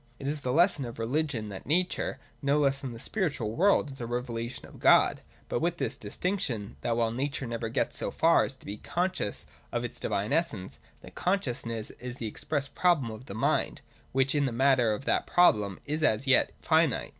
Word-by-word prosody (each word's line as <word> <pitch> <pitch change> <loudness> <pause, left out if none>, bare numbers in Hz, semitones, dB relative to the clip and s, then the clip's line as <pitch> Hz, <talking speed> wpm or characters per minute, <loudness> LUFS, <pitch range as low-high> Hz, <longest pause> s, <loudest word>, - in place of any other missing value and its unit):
It 135 - -6
is 145 +1 -2
the 125 - -1
lesson 170 0 +3
of 120 - -7
religion 120 -2 -1
that 95 -2 -8
nature, 175 +5 0 0.2
no 140 0 +2
less 140 -2 +2
than 135 -3 -4
the 115 - -9
spiritual 145 - -1
world, 165 - +3
is 135 - -9
a 115 - -3
revelation 120 -1 -4
of - - -14
God: - - +5 0.3
but - - -1
with 170 +1 0
this - - -2
distinction, 140 - -3
that 115 -1 0
while 115 -1 +2
nature 135 +2 -2
never 115 -1 -3
gets - - 0
so - - -1
far - - +4
as - - -4
to - - -20
be 100 - -5
conscious 180 - -2 0.3
of - - -1
its - - -5
divine 100 +2 -1
essence, 115 - -1 0.2
that - - -12
conscious 180 -12 -1
ness 115 -2 -4
is 125 0 -6
the 115 - -4
express 140 +6 -2
problem 155 -8 +2
of 110 +4 -10
the 100 - -7
mind, 115 - 0 0.3
which 135 0 +2
in 145 -2 +2
the 130 - 0
matter 130 -1 +3
of 125 +6 -3
that - - +1
problem 105 - +4
is 150 +2 -2
as 110 -3 +2
yet 135 -1 +4
finite. 160 -5 +2
130 Hz, 205 wpm, -29 LUFS, 115-155 Hz, 0.3 s, God